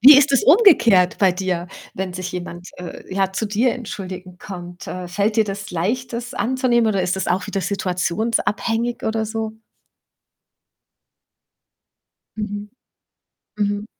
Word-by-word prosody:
Wie 280 +4 +10
ist 285 0 +3
es 270 - +4
umgekehrt 270 - +6
bei 190 -2 +5
dir, 180 -2 -2 0.3
wenn 190 -1 -3
sich 185 0 -4
jemand, 180 0 -6
äh, 180 -1 -8
ja, 195 -1 +1
zu 220 - -1
dir 225 +4 +2
entschuldigen 185 -6 -7
kommt? 175 -2 -8
Äh, 180 -1 -5
fällt 205 +4 0
dir 220 - +5
das 200 0 -5
leicht, 230 +9 -1
das 245 +2 -5
anzunehmen, 240 -2 +2
oder 195 -3 +1
ist 180 +1 0
das 190 - -2
auch 185 +2 0
wieder 200 -1 -2
situationsabhängig 215 +5 -1
oder 220 0 0
so? 220 0 -3 2.8
Mhm, 205 -1 -4 0.9
mhm. 205 0 0
205 Hz, 135 wpm, -21 LUFS, 185-230 Hz, 2.8 s, Wie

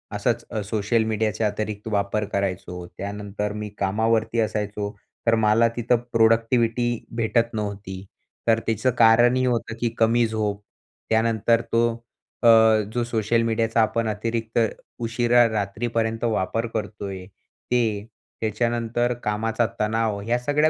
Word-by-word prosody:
असंच - - -1 0.2
सोशल 110 +2 +1
मीडियाचे 110 0 -1
अतिरिक्त 105 0 -2
वापर 100 +1 0
करायचो. 90 -2 -3
त्यानंतर 105 +1 -4
मी 105 0 -5
कामावरती 110 +3 +1
असायचो, 105 -1 -2 0.4
तर 115 - +5
मला 110 +1 +4
तिथं 120 +1 +2 0.2
प्रोडक्टिव्हिटी 115 +1 +2
भेटत 115 +1 +1
नव्हती. 100 -2 -5 0.4
तर 115 0 +4
त्याचं 115 +3 +1
कारण 120 +2 +6
हे 130 0 +1
होतं, 120 -2 -1
की 120 - +1
कमी 115 +1 +3
झोप. 105 -2 -2 0.5
त्यानंतर 115 0 +2
तो 115 +1 +3 0.6
अ, - - +5 0.5
जो 120 - 0
सोशल 115 0 +1
मीडियाचा 115 0 +1
आपण 110 +1 +1
अतिरिक्त 115 +2 -3 0.5
उशिरा 120 +1 +3
रात्रीपर्यंत 110 +2 -2
वापर 115 0 0
करतो 105 -1 -4
आहे 95 -1 -7 0.5
ते, 110 -4 +1 0.4
त्याच्यानंतर 120 +2 0
कामाचा 115 +2 0
तणाव, 110 -1 0
ह्या 120 +4 0
सगळ्या 145 +4 +2
110 Hz, 125 wpm, -24 LUFS, 105-115 Hz, 0.6 s, कारण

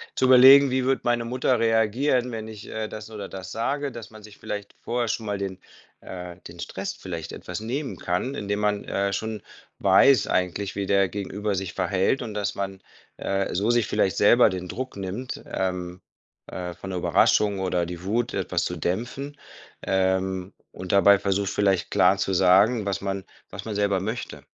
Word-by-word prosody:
zu - - +2
überlegen: 130 +2 +8
„Wie 130 0 +1
wird 135 +1 +1
meine 120 -1 +1
Mutter 125 0 +1
reagieren, 115 +3 +2
wenn 110 -1 -5
ich, 110 -2 -10
äh, 110 0 -3
das 110 0 -8
oder 105 -2 -6
das 95 -1 -8
sage?“, 140 +5 -2
dass 120 -3 -9
man 110 -1 -14
sich 105 -1 -14
vielleicht 105 -1 -6
vorher 120 -1 -1
schon 110 0 -2
mal 105 -1 -2
den 95 -2 -5 0.4
äh, 90 -1 -8
den - - -11
Stress - - -5
vielleicht 85 -4 -7
etwas 90 +1 -6
nehmen 130 +6 -4
kann, 90 +10 -2
indem 105 -5 -3
man, 105 -1 0
äh, 100 0 -1
schon 110 +1 -3 0.4
weiß 135 -6 +5
eigentlich, 95 +2 -1
wie 100 - -1
der 100 -1 +3
Gegenüber 100 +1 -3
sich 95 -1 -4
verhält 95 +7 +1
und 110 - -5
dass 105 -1 -2
man, 95 -1 -4 0.4
äh, 95 0 -1
so 100 +5 0
sich 120 -2 +3
vielleicht 95 -3 +1
selber 120 +4 +6
den 90 -1 -5
Druck 130 +5 -5
nimmt, 100 +6 -5
ähm, 90 -1 -3 0.5
äh, 90 -1 -5
von 95 - -8
der 90 - -2
Überraschung 100 +3 +3
oder 90 -2 0
die 85 0 -7
Wut, 115 +4 0
etwas - - -1
zu - - -3
dämpfen, 125 +10 -3 0.4
ähm, 95 0 0 0.2
und 90 -1 -5
dabei 100 0 +6
versucht, 100 0 0
vielleicht 95 -4 +1
klar 90 +3 +4
zu 95 0 -1
sagen, 100 +5 +4
was 100 -1 -2
man 95 -1 -3 0.3
was 95 +1 -8
man 110 -2 -4
selber 100 -2 +1
möchte. 110 +5 -5
100 Hz, 185 wpm, -25 LUFS, 95-115 Hz, 0.5 s, überlegen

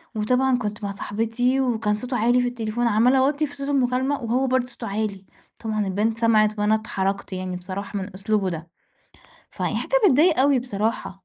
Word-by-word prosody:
وطبعًا 250 +4 +2
كنت 210 -2 -5
مع 200 - -2
صاحبتي، 225 +6 -1
وكان 225 -4 0
صوته 245 +3 -3
عالي 240 +3 +3
في 245 - 0
التليفون، 240 0 -2
عمّالة 235 +5 +4
اوطّي 285 +3 +2
في 285 0 -9
صوت 280 0 -5
المكالمة، 265 0 +1
وهو 250 +4 +1
برضه 255 -1 +1
صوته 235 -1 -8
عالي، 200 -1 -3 0.4
طبعًا 215 -2 -1
البنت 215 +4 0
سمَعت 215 -2 +3
وأنا 210 +1 +3
اتحرَجت، 200 -3 -3
يعني 185 -1 -4
بصراحة 195 +3 -5
من 190 - -7
أسلوبه 195 -1 0
ده. 165 0 -6 0.8
فيعني - - -2
حاجة - - +1
بتضايق 305 +1 +4
أوي 275 -1 +4
بصراحة. 215 -5 -3
225 Hz, 175 wpm, -23 LUFS, 205-250 Hz, 0.8 s, عمّالة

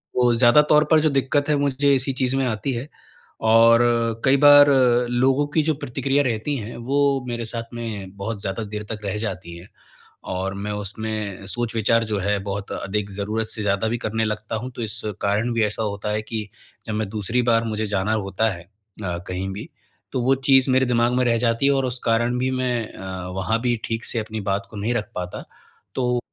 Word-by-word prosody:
वो 125 -1 +4
ज़्यादा 120 +4 +6
तौर 150 0 +6
पर 160 - +7
जो 155 0 +2
दिक्कत 140 +2 +1
है 150 - +4
मुझे 140 0 +2
इसी 135 +1 0
चीज़ 130 0 0
में 135 -1 +1
आती 115 +4 -2
है, 120 +4 -4 0.5
और 115 +1 +6 0.5
कई 135 +1 +5
बार 145 0 +8
अ, 125 -3 +4
लोगों 130 +4 +2
की 160 - +5
जो - - +3
प्रतिक्रिया 135 +3 0
रहती 125 +3 -1
हैं 115 -1 -6
वो 140 - +2 0.3
मेरे 120 -1 -3
साथ 115 +1 -6
में 105 -5 -6
बहुत 100 +1 -4
ज़्यादा 100 +4 -3
देर 105 0 -5
तक 110 - -4
रह 100 +1 -2
जाती 95 -5 -5
हैं 85 +3 -12 0.7
और 95 +1 -2
मैं 100 +1 -4
उसमें 105 -1 -5
सोच 120 +3 -3
विचार 115 +1 +2
जो 105 -2 -2
है 100 +2 0
बहुत 100 0 -4
अधिक 100 +1 -3
ज़रूरत 105 +3 -2
से 110 -1 -3
ज़्यादा 100 +1 +1
भी 120 - -1
करने 110 +1 0
लगता 110 +1 -3
हूँ। 125 +4 -5
तो - - -4
इस 110 0 -4 0.2
कारण 105 +4 +1
भी 115 -1 +1
ऐसा 105 +1 -2
होता 105 -1 -3
है 105 - -1
कि 110 -1 -5 0.4
जब 110 - -3
मैं 110 -1 -1
दूसरी 110 +4 -1
बार 115 0 +3
मुझे 110 -1 -2
जाना 100 +1 0
होता 105 +1 0
है 85 - -10 0.4
अ, 85 -2 -2
कहीं 90 +1 -3
भी, 100 +3 -7 0.4
तो 130 - -1
वो 130 +2 +4
चीज़ 135 -1 +5
मेरे 130 0 +3
दिमाग 120 0 +2
में 125 0 +2
रह 115 -1 +2
जाती 115 +2 +1
है 140 - +4
और 135 -1 +1
उस 125 0 -4
कारण 120 +1 +1
भी 130 +1 0
मैं 125 -3 -1
अ, 95 -1 -7
वहाँ 95 +5 -1
भी 120 0 +1
ठीक 115 0 -3
से 115 - -2
अपनी 110 0 -4
बात 100 0 -1
को 110 - -10
नहीं 110 +4 -1
रख 110 -3 -2
पाता। 90 0 -5 0.5
तो 125 -1 +1
115 Hz, 215 wpm, -23 LUFS, 105-125 Hz, 0.7 s, बार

